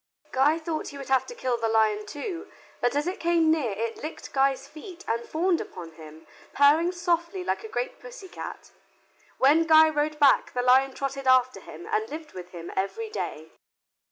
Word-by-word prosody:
Guy 285 +5 +3
thought 320 -1 -4
he 285 - -8
would 275 -1 -8
have 265 -1 +2
to 485 - -8
kill 255 - -1
the 230 - 0
lion 215 -1 +2
too, 335 - -6 0.3
but 245 +2 +1
as 290 +1 +1
it 365 +2 -3
came 335 -2 +3
near 305 -7 +1
it 225 +3 -4
licked 310 +2 -7
Guy's 270 0 +1
feet 335 +4 -11
and 230 +1 -1
fawned 345 +2 +1
upon 170 -2 -9
him, 155 0 -13 0.3
purring 305 +5 +4
softly 350 +1 -1
like - - -2
a - - -6
great - - -4
pussy - - -11
cat. - - -9 0.7
When 300 +5 +4
Guy 315 0 +7
rode 300 0 -1
back 285 -2 +4
the 245 - -1
lion 260 +1 +4
trotted 275 -1 -4
after 255 -4 +4
him 170 -2 -11
and 220 +1 -1
lived 310 0 -8
with 180 -1 -9
him 170 -1 -8
every 425 - -3
day. - - -5
285 Hz, 190 wpm, -26 LUFS, 235-330 Hz, 0.7 s, Guy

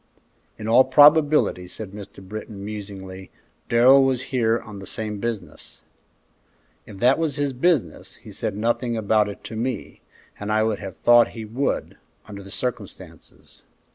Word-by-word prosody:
"In 110 - -7
all 120 +3 +6
probability," 145 - +4
said 95 +2 -8
Mr. 100 -2 -11
Britton, 105 -1 -8
musingly, 95 -3 -8 0.4
"Darrell 130 +4 +6
was 130 -1 0
here 115 -2 +2
on 105 -3 -10
the 95 - -9
same 105 -2 -4
business." 115 -1 -7 1.0
"If 100 - -11
that 125 +8 +3
was 160 -4 -1
his 145 -2 -1
business, 150 +1 -1
he - - -14
said 105 - -4
nothing 120 +2 -1
about 105 -1 +2
it 100 - -10
to 110 - -8
me, 120 +2 -4 0.4
and 105 +1 -4
I 110 0 +2
would 110 -2 -1
have 95 -3 -8
thought 120 0 +4
he 110 - -6
would, 125 +6 -3 0.3
under 100 -1 -9
the 100 - -12
circumstances." 120 -2 -8
110 Hz, 155 wpm, -23 LUFS, 105-125 Hz, 1.0 s, all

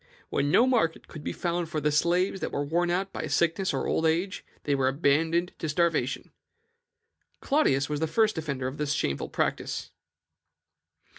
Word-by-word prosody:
When 140 +1 +1
no 235 - +5
market 225 -11 +1
could 155 - -10
be - - -2
found 175 -2 -2
for 155 - -2
the 150 +1 +1
slaves 175 +5 +2
that - - -3
were 145 - -1
worn 170 +4 +1
out 190 +2 -1
by - - -4
sickness 170 +3 +1
or - - -2
old - - 0
age, 175 +5 -1 0.2
they 145 - 0
were 135 -1 +2
abandoned 160 +5 +1
to 160 - -3
starvation. 155 -5 0 1.1
Claudius 145 - +2
was 150 -1 -2
the 160 - 0
first 215 +6 +2
defender 140 -5 -3
of 130 +3 -6
this 150 -1 0
shameful 70 - -1
practice." - - -2
160 Hz, 170 wpm, -27 LUFS, 145-175 Hz, 1.1 s, no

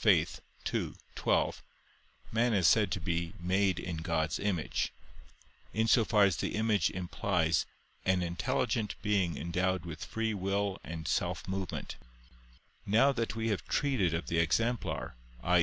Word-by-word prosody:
ii, - - +6 0.9
12), - - +1 0.7
man 115 0 +2
is 95 -4 +2
said 105 -4 +4
to - - 0
be 85 -1 -2
made 95 +1 +2
in 90 -2 -4
God's 80 0 -1
image, 95 -6 -1 0.8
in 110 +2 +2
so 115 0 +5
far 105 -1 +4
as 95 -6 +3
the - - -2
image 105 -6 +2
implies 90 -2 0 0.4
"an 95 -1 +2
intelligent 90 +5 -1
being 100 -5 +1
endowed 90 +2 0
with 80 -2 -6
free 115 -1 -1
will 100 0 -1
and 80 -2 -6
self - - -1
movement": 95 -2 -4 0.9
now 115 +8 +4
that 115 -4 -2
we 115 0 -1
have 105 - -1
treated 130 - +1
of 85 +1 -2
the 85 - 0
exemplar, 115 +9 0 0.3
i. 90 0 +4
95 Hz, 140 wpm, -32 LUFS, 85-110 Hz, 0.9 s, ii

